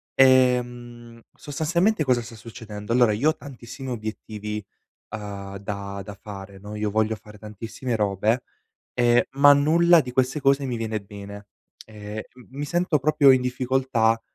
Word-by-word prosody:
Ehm, 120 -2 +2
sostanzialmente 165 +6 0
cosa 125 -2 +2
sta 115 0 -10
succedendo: 110 -1 -7
allora 120 -2 +5
io 120 +9 +2
ho 155 - 0
tantissimi 135 -1 -9
obiettivi, 105 -2 -5 0.4
uhm, 100 -2 -7
da 100 0 -5
da 105 +1 -8
fare, 100 -1 -9
no, 105 +2 -9
io 105 0 -1
voglio 110 +1 +1
fare 105 0 -15
tantissime 115 +4 -5
robe 105 +4 +1 0.5
e 120 -1 +3
ma 140 +1 +7
nulla 165 +4 +5
di 125 -4 -5
queste 130 +3 +1
cose 140 0 +3
mi 125 -2 -2
viene 110 -1 -3
bene. 100 0 -10 0.4
Ehm, 105 0 -7
m 125 - -15 0.2
mi 145 - -2
sento 175 0 +1
proprio 145 0 +5
in 130 -1 +5
difficoltà 125 -2 +1
120 Hz, 150 wpm, -24 LUFS, 105-135 Hz, 0.5 s, ma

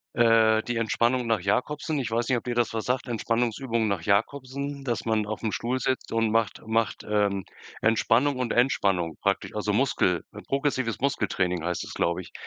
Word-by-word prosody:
äh, 110 -1 +4
die 120 -1 -2
Entspannung 120 +2 +1
nach 115 -4 +2
Jacobsen. 145 - -1
Ich 125 - -2
weiß 115 +3 -1
nicht, 130 - +3
ob - - -5
dir 120 -1 -3
das 120 -1 +2
sagt. 125 +3 -2
Entspannungsübungen 115 0 0
nach 100 -4 -1
Jacobsen, 135 +8 -1
dass 120 -3 -2
man 110 -1 +1
aufm 110 0 -3
Stuhl 125 +4 -1
sitzt 130 +1 -2
und 115 -1 +1
macht 115 -3 0
macht, 110 0 0
ähm, 100 -2 +1 0.4
Entspannung 115 +5 +3
und 125 -2 -1
Entspannung 95 - +1
praktisch. 100 -1 -1
Also 105 -1 -1
Muskel 100 -7 +1 0.2
progressives 135 -4 -1
Muskeltraining 90 - 0
heißt 90 0 -2
das, - - -8
glaube 85 +1 0
ich. - - -13
115 Hz, 175 wpm, -26 LUFS, 105-125 Hz, 0.4 s, äh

